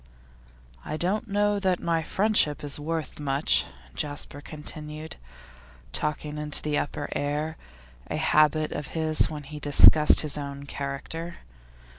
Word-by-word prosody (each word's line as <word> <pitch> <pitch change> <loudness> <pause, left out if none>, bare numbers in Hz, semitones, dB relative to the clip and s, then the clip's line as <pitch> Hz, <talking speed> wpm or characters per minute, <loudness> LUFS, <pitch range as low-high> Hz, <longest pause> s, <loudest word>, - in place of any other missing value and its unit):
'I 155 - -4
don't 200 +7 -1
know 205 0 +1
that 185 -3 +1
my 165 -1 0
friendship 190 -4 +1
is 145 0 0
worth 160 +1 -4
much,' 140 0 +2 0.3
Jasper 145 - -4
continued, 150 +1 -8 0.7
talking 150 - -3
into 150 -1 -1
the 150 -1 -1
upper 145 0 -2
air, 150 +2 -2 0.5
a - - -3
habit 155 -1 +3
of 150 - -5
his 155 -1 +3
when 150 -2 -7
he 150 +2 -9
discussed 150 +1 +7
his 150 -1 0
own 140 0 -7
character. 140 +5 -5
150 Hz, 130 wpm, -26 LUFS, 145-160 Hz, 0.7 s, discussed